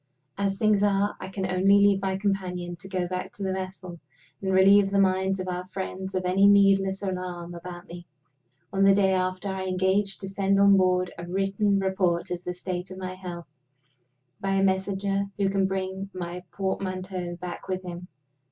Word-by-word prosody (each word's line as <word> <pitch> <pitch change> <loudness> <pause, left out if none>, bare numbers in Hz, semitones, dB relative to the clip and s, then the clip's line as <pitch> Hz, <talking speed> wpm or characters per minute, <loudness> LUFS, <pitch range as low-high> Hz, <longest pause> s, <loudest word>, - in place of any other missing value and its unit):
As 195 -1 -1
things 210 -1 +3
are, 205 0 +2
I 190 - -6
can 190 0 -4
only 185 +2 +4
leave 200 -1 +4
my 190 -1 -1
companion 180 -3 -2
to 190 - -11
go 185 -2 -1
back 180 0 -4
to 200 - -7
the 190 -1 -1
vessel, 185 -2 -6 0.4
and 190 -1 -1
relieve 195 +1 +6
the 200 - 0
minds 190 0 +2
of 185 - -4
our 180 0 -4
friends 190 0 -5
of 185 -1 -1
any 190 +2 +4
needless 195 -1 +4
alarm 180 -2 -4
about 175 0 -8
me. 175 0 -10 0.7
On 195 0 +2
the 195 0 +6
day 195 -1 +3
after, 185 +1 -1
I 190 0 -3
engage 190 +2 +1
to 195 - -7
send 195 0 +1
on 200 0 +7
board 185 -1 +2
a 170 - -6
written 195 +2 +1
report 190 -2 0
of 180 0 -3
the 180 - -3
state 180 0 -4
of 185 - -9
my 185 -1 -5
health, 180 -2 -7 0.9
by 195 0 -1
a 195 - +2
messenger 195 +1 0
who 200 -1 +2
can 195 -1 +2
bring 190 0 -3
my 175 0 -5
portmanteau 185 -2 -3
back 175 0 -7
with 185 0 -3
him. 175 0 -7
190 Hz, 190 wpm, -26 LUFS, 185-195 Hz, 0.9 s, on